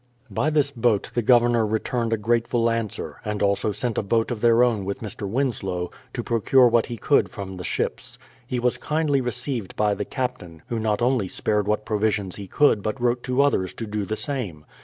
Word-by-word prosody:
By 145 Hz, +10 st, +1 dB
this 150 Hz, -2 st, +2 dB
boat 115 Hz, -5 st, +1 dB
the 120 Hz, -, +1 dB
Governor 120 Hz, 0 st, +4 dB
returned 115 Hz, +2 st, -1 dB
a 115 Hz, -, +2 dB
grateful 115 Hz, +2 st, +1 dB
answer, 115 Hz, -3 st, -4 dB
and 105 Hz, -1 st, -2 dB
also 100 Hz, +1 st, +1 dB
sent 115 Hz, +3 st, -2 dB
a -, -, +1 dB
boat 115 Hz, +3 st, 0 dB
of 115 Hz, -3 st, -4 dB
their 120 Hz, 0 st, +5 dB
own 115 Hz, -5 st, +1 dB
with 100 Hz, +1 st, -4 dB
Mr. 105 Hz, -2 st, -5 dB
Winslow, 95 Hz, -8 st, -2 dB, 0.2 s
to -, -, -2 dB
procure 120 Hz, +3 st, +4 dB
what 120 Hz, -1 st, +2 dB
he 120 Hz, -, -5 dB
could 145 Hz, +5 st, +2 dB
from 95 Hz, -4 st, -7 dB
the 90 Hz, -, -6 dB
ships. -, -, -3 dB, 0.3 s
He 125 Hz, -, -2 dB
was 125 Hz, 0 st, 0 dB
kindly 150 Hz, -3 st, +1 dB
received 125 Hz, -3 st, -3 dB
by 105 Hz, -1 st, +2 dB
the 105 Hz, -, -3 dB
captain, 100 Hz, -, -5 dB
who 115 Hz, -, -1 dB
not 110 Hz, +1 st, 0 dB
only 125 Hz, -5 st, +2 dB
spared 105 Hz, +2 st, -1 dB
what 105 Hz, 0 st, 0 dB
provisions 105 Hz, -3 st, -1 dB
he 100 Hz, -2 st, -7 dB
could 115 Hz, 0 st, +3 dB
but 110 Hz, +5 st, -3 dB
wrote 120 Hz, 0 st, +1 dB
to 130 Hz, +2 st, +2 dB
others 95 Hz, -10 st, 0 dB
to 115 Hz, -, -5 dB
do 105 Hz, -1 st, -3 dB
the 110 Hz, +3 st, -3 dB
same. 105 Hz, -, -2 dB
115 Hz, 205 wpm, -24 LUFS, 105-125 Hz, 0.3 s, their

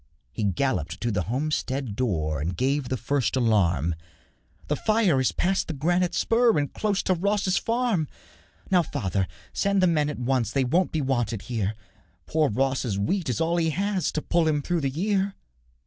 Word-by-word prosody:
He 110 Hz, -, -4 dB
galloped 95 Hz, -, -1 dB
to 120 Hz, -, 0 dB
the 100 Hz, -3 st, 0 dB
homestead 135 Hz, -3 st, -2 dB
door 80 Hz, -, -1 dB
And 85 Hz, +3 st, -3 dB
gave 135 Hz, +2 st, 0 dB
the 130 Hz, -, -1 dB
first 130 Hz, +2 st, 0 dB
alarm: 90 Hz, -, +2 dB, 0.7 s
'The 150 Hz, -, +1 dB
fire 215 Hz, -10 st, +2 dB
is 130 Hz, -, +2 dB
past 190 Hz, +2 st, 0 dB
the 165 Hz, -, -3 dB
granite 175 Hz, +4 st, +1 dB
spur, 230 Hz, -2 st, +3 dB
'And 145 Hz, -2 st, -1 dB
close 205 Hz, -2 st, 0 dB
to 185 Hz, -, +2 dB
Ross's 195 Hz, +1 st, +1 dB
farm.' 230 Hz, -9 st, 0 dB, 0.6 s
'Now, 180 Hz, -2 st, +5 dB
father, 95 Hz, -, -2 dB, 0.3 s
send 200 Hz, 0 st, +1 dB
the 185 Hz, -, +4 dB
men 155 Hz, -4 st, +2 dB
at 150 Hz, -, -4 dB
once, 125 Hz, -1 st, 0 dB
They 135 Hz, +2 st, +1 dB
won't 170 Hz, +9 st, +1 dB
be 160 Hz, -, -1 dB
wanted 120 Hz, -6 st, -1 dB
here; 110 Hz, -4 st, -2 dB, 0.5 s
Poor 155 Hz, -2 st, +1 dB
Ross's 130 Hz, -2 st, 0 dB
wheat 160 Hz, -, -1 dB
is 125 Hz, -, -1 dB
all 165 Hz, +1 st, +1 dB
he 165 Hz, -1 st, +2 dB
has 195 Hz, +3 st, 0 dB
To 155 Hz, -, -2 dB
pull 170 Hz, -2 st, +2 dB
him 150 Hz, -2 st, +1 dB
through 175 Hz, +1 st, 0 dB
the 135 Hz, -, 0 dB
year.' 195 Hz, +6 st, 0 dB
145 Hz, 180 wpm, -26 LUFS, 120-180 Hz, 0.7 s, Now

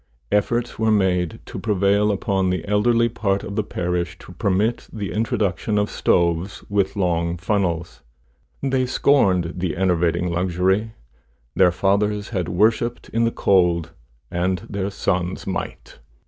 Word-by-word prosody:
Efforts 120 Hz, +3 st, 0 dB
were 110 Hz, 0 st, +2 dB
made 90 Hz, -5 st, +1 dB
to -, -, -7 dB
prevail 100 Hz, 0 st, +2 dB
upon 95 Hz, -2 st, 0 dB
the 90 Hz, -1 st, -2 dB
elderly 115 Hz, +3 st, +3 dB
part 100 Hz, -4 st, -1 dB
of 100 Hz, -, -6 dB
the 110 Hz, -, +2 dB
parish 90 Hz, -2 st, -2 dB
to 90 Hz, -, -13 dB
permit 100 Hz, +4 st, 0 dB
the 105 Hz, -3 st, -5 dB
introduction 105 Hz, -3 st, -1 dB
of 105 Hz, 0 st, 0 dB
stoves 85 Hz, +2 st, 0 dB
with 100 Hz, -1 st, 0 dB
long 85 Hz, -3 st, 0 dB
funnels. 85 Hz, -, -1 dB, 0.6 s
They 130 Hz, -2 st, +1 dB
scorned 95 Hz, -, +2 dB
the 90 Hz, -3 st, -2 dB
enervating 90 Hz, -1 st, +1 dB
luxury! 95 Hz, +5 st, 0 dB, 0.6 s
Their 90 Hz, -2 st, +5 dB
fathers 100 Hz, +3 st, 0 dB
had 90 Hz, -6 st, -2 dB
worshipped 115 Hz, +5 st, +1 dB
in 115 Hz, +1 st, +1 dB
the 115 Hz, -, +1 dB
cold, 85 Hz, -6 st, +2 dB, 0.4 s
and 90 Hz, 0 st, -1 dB
their 100 Hz, -1 st, -3 dB
sons 90 Hz, -2 st, -2 dB
might. -, -, -5 dB
95 Hz, 135 wpm, -22 LUFS, 90-105 Hz, 0.6 s, Their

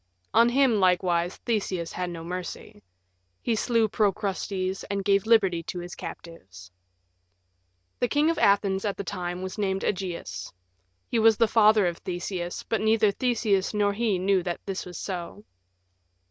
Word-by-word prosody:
On 230 Hz, +3 st, +6 dB
him, 250 Hz, -3 st, +3 dB
likewise, 180 Hz, -2 st, +2 dB
Theseus 195 Hz, -7 st, -1 dB
had 180 Hz, -1 st, -3 dB
no 165 Hz, -1 st, -7 dB
mercy; 180 Hz, -, -7 dB, 0.6 s
he 235 Hz, -, -1 dB
slew 225 Hz, 0 st, +2 dB
Procrustes 195 Hz, -2 st, -1 dB
and 200 Hz, -1 st, -3 dB
gave 200 Hz, +1 st, +2 dB
liberty 195 Hz, -7 st, +4 dB
to 175 Hz, -, -6 dB
his 175 Hz, 0 st, -6 dB
captives. 95 Hz, -, -10 dB, 1.3 s
The 245 Hz, -, +2 dB
King 295 Hz, +5 st, +2 dB
of 330 Hz, -, -3 dB
Athens 200 Hz, -1 st, +3 dB
at 205 Hz, -2 st, -2 dB
the -, -, -3 dB
time 180 Hz, -2 st, -4 dB
was 190 Hz, +3 st, -6 dB
named 195 Hz, -1 st, -1 dB
Ægeus. 170 Hz, -, -4 dB, 0.6 s
He 235 Hz, -, 0 dB
was 225 Hz, 0 st, +6 dB
father 215 Hz, -2 st, +4 dB
of 175 Hz, -1 st, -2 dB
Theseus, 175 Hz, 0 st, -4 dB
but 225 Hz, -, -1 dB
neither 220 Hz, -1 st, +3 dB
Theseus 215 Hz, -4 st, 0 dB
nor 205 Hz, -1 st, +2 dB
he 215 Hz, -2 st, 0 dB
knew 190 Hz, +1 st, +2 dB
that 175 Hz, -1 st, -4 dB
this 195 Hz, -2 st, -4 dB
was 175 Hz, -2 st, -8 dB
so. 185 Hz, +2 st, -6 dB
195 Hz, 150 wpm, -26 LUFS, 180-215 Hz, 1.3 s, On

